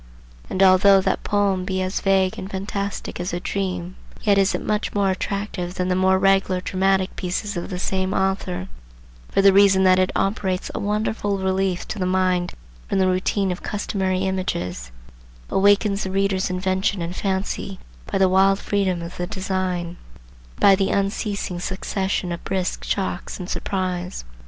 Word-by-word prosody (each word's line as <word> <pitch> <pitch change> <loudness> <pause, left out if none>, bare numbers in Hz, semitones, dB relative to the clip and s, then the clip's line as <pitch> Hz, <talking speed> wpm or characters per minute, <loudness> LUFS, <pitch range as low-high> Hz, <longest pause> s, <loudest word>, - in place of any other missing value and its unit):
And 190 - +2
although 195 +1 +7
that 190 - -1
poem 200 -2 +1
be 190 0 -2
as 185 +1 -2
vague 190 -1 +2
and 190 - -6
fantastic 200 0 -4
as 175 0 -3
a 175 - -1
dream, 185 -1 -3 0.3
yet 200 -2 +4
is 195 0 +2
it - - -4
much 210 0 -1
more 200 -1 +2
attractive 190 -2 -3
than 180 0 -1
the 180 - +2
more 190 0 +3
regular 195 -1 +3
dramatic 190 +1 0
pieces 195 +3 -3
of 175 - -4
the 180 - -4
same 190 +1 -1
author, 190 - -1 0.6
for 195 - +2
the 195 -1 +7
reason 195 -1 +5
that 185 0 +5
it 185 0 +2
operates 195 -2 -1
a - - -3
wonderful 210 0 -1
relief 190 -1 -1
to 215 - -4
the 185 - 0
mind 185 -1 +1 0.4
from - - 0
the 190 - +3
routine 185 +1 +1
of 180 - -5
customary 190 -3 -1
images,—awakens 90 - -1
the 190 - -3
reader's 195 -1 0
invention 185 0 0
and 170 +2 -5
fancy 190 0 -2 0.3
by - - +1
the 190 -1 +4
wild 195 +1 +4
freedom 190 -4 -1
of 170 +1 -8
the 175 - -3
design, 185 -3 -2
and - - -16
by 200 - +7
the 195 0 +2
unceasing 200 -2 -1
succession 190 0 -2
of 170 - -5
brisk 190 -1 -2
shocks 190 -2 -3
of 180 - -5
surprise. 180 - -3
190 Hz, 165 wpm, -22 LUFS, 180-195 Hz, 0.6 s, although